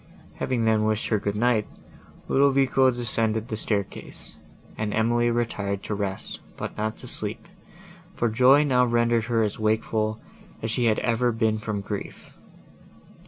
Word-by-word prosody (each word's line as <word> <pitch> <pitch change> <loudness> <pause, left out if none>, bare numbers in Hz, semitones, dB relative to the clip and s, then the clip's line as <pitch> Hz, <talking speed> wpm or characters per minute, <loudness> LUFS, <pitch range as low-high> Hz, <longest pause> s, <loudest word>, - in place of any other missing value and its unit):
Having 120 -3 0
then 110 -1 +3
wished 110 0 0
her 110 - +2
good 100 0 -2
night, 115 -1 +2 0.6
Ludovico 135 -1 +4
descended 115 -2 0
the 110 - -2
staircase, 105 -2 -4 0.4
and 105 -1 -2
Emily 120 +2 +2
retired 105 -4 -2
to - - -3
rest, 100 -2 -4 0.2
but - - -5
not 110 +1 -2
to - - -10
sleep, - - -5 0.7
for 120 - +1
joy 130 +6 +5
now 125 -4 +3
rendered 120 -1 +2
her 115 -1 +1
as 105 0 -2
wakeful, 110 0 0 0.4
as 110 - -1
she 120 0 +1
had 110 -2 +3
ever 120 +1 +1
been 110 -1 0
from 105 -2 -3
grief. 100 0 -7
110 Hz, 150 wpm, -25 LUFS, 110-120 Hz, 0.7 s, joy